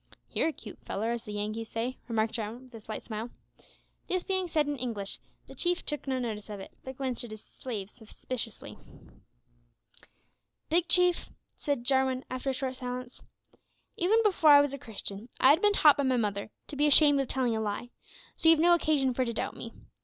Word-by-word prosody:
"You're -, -, +1 dB
a -, -, 0 dB
cute 215 Hz, -8 st, -11 dB
fellar, 220 Hz, +4 st, -2 dB
as 235 Hz, -1 st, -4 dB
the 210 Hz, -, -7 dB
Yankees 215 Hz, +2 st, -4 dB
say," 240 Hz, +3 st, -3 dB
remarked 220 Hz, -2 st, 0 dB
Jarwin, 225 Hz, +3 st, -4 dB
with 255 Hz, -1 st, -18 dB
a 225 Hz, -, -8 dB
slight 215 Hz, 0 st, -7 dB
smile. 220 Hz, +1 st, -5 dB, 0.8 s
This 370 Hz, -1 st, 0 dB
being 375 Hz, -2 st, 0 dB
said 310 Hz, -3 st, +1 dB
in 290 Hz, -, -1 dB
English, 220 Hz, -5 st, -3 dB, 0.3 s
the 270 Hz, -, -13 dB
Chief 350 Hz, +6 st, 0 dB
took 295 Hz, -2 st, -4 dB
no 260 Hz, -1 st, 0 dB
notice 220 Hz, -4 st, -4 dB
of 205 Hz, -1 st, -6 dB
it, 195 Hz, -, -9 dB
but 260 Hz, 0 st, -8 dB
glanced 260 Hz, -3 st, -3 dB
at 240 Hz, -, -8 dB
his 215 Hz, 0 st, -10 dB
slave 210 Hz, -6 st, -7 dB
suspiciously. 230 Hz, 0 st, -7 dB, 1.9 s
"Big 345 Hz, +1 st, +3 dB
Chief," 360 Hz, 0 st, +3 dB, 0.3 s
said 285 Hz, -5 st, -2 dB
Jarwin, 265 Hz, 0 st, +1 dB
after 255 Hz, +1 st, -3 dB
a -, -, 0 dB
short 260 Hz, -1 st, -3 dB
silence, 250 Hz, -1 st, -6 dB, 0.7 s
"even 375 Hz, +6 st, +2 dB
before 370 Hz, -7 st, +4 dB
I 285 Hz, -1 st, +9 dB
was 285 Hz, -1 st, -1 dB
a 280 Hz, -, -5 dB
Christian, 210 Hz, 0 st, -5 dB
I 265 Hz, -, +7 dB
had 320 Hz, +5 st, +3 dB
been 415 Hz, 0 st, +4 dB
taught 300 Hz, -7 st, +6 dB
by 285 Hz, -, +1 dB
my 260 Hz, -2 st, +2 dB
mother 205 Hz, -2 st, -1 dB, 0.2 s
to -, -, -7 dB
be 295 Hz, +2 st, +3 dB
ashamed 290 Hz, -1 st, +8 dB
of 270 Hz, -, -3 dB
telling 250 Hz, -3 st, 0 dB
a 220 Hz, -, -1 dB
lie, 220 Hz, +3 st, -4 dB, 0.4 s
so 325 Hz, -, +3 dB
you've 325 Hz, -, +7 dB
no 345 Hz, +3 st, +5 dB
occasion 295 Hz, -6 st, +2 dB
for 255 Hz, -, 0 dB
to 235 Hz, -2 st, -3 dB
doubt -, -, -3 dB
me. -, -, -7 dB
255 Hz, 205 wpm, -29 LUFS, 225-290 Hz, 1.9 s, I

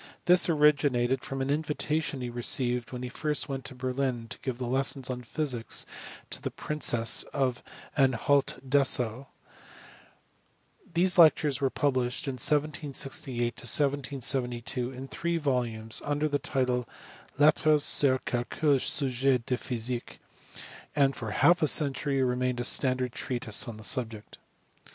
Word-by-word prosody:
This 180 Hz, 0 st, +5 dB
ori 150 Hz, -2 st, +5 dB
ginated 130 Hz, -3 st, -1 dB
from 135 Hz, 0 st, -4 dB
an 135 Hz, -, -2 dB
invitation 150 Hz, -1 st, -2 dB
he 120 Hz, -1 st, -5 dB
received 120 Hz, 0 st, 0 dB
when 125 Hz, -1 st, -6 dB
he -, -, -4 dB
first 150 Hz, +4 st, -2 dB
went 135 Hz, -2 st, -5 dB
to 130 Hz, -, -6 dB
Berlin 130 Hz, -1 st, -3 dB
to -, -, -7 dB
give 130 Hz, -2 st, -5 dB
lessons 130 Hz, +1 st, -1 dB
on 125 Hz, -1 st, -5 dB
physics 125 Hz, -2 st, -1 dB, 0.5 s
to -, -, -2 dB
the -, -, -3 dB
princess 120 Hz, -6 st, +2 dB
of 130 Hz, -3 st, -1 dB, 0.3 s
Anhalt 135 Hz, +1 st, +1 dB
Dessau. 130 Hz, -2 st, +2 dB, 1.6 s
These 180 Hz, +2 st, +3 dB
lectures 150 Hz, -4 st, +4 dB
were 135 Hz, -, +2 dB
published 130 Hz, +2 st, -1 dB
in 135 Hz, -, -2 dB
1768 145 Hz, -2 st, 0 dB, 0.2 s
1772 130 Hz, -2 st, +1 dB
in 130 Hz, +1 st, -9 dB
three 170 Hz, +5 st, -3 dB
volumes 120 Hz, -7 st, -1 dB
under 145 Hz, +1 st, -1 dB
the 145 Hz, -1 st, -1 dB
title 125 Hz, -2 st, -2 dB, 0.5 s
Lettres...sur 145 Hz, -2 st, +4 dB
quelques 135 Hz, +3 st, 0 dB
sujets 130 Hz, -2 st, 0 dB
de 130 Hz, -, -1 dB
physique..., 120 Hz, 0 st, -4 dB, 0.8 s
and 140 Hz, -2 st, +2 dB
for 115 Hz, -, -6 dB
half 170 Hz, +10 st, +3 dB
a 155 Hz, -, +3 dB
century 140 Hz, -2 st, +2 dB
remained 125 Hz, 0 st, -1 dB
a -, -, -2 dB
standard 130 Hz, 0 st, +2 dB
treatise 120 Hz, -2 st, -2 dB
on 115 Hz, -2 st, -7 dB
the 110 Hz, -, -12 dB
subject. 115 Hz, -3 st, -2 dB
130 Hz, 130 wpm, -28 LUFS, 125-145 Hz, 1.6 s, This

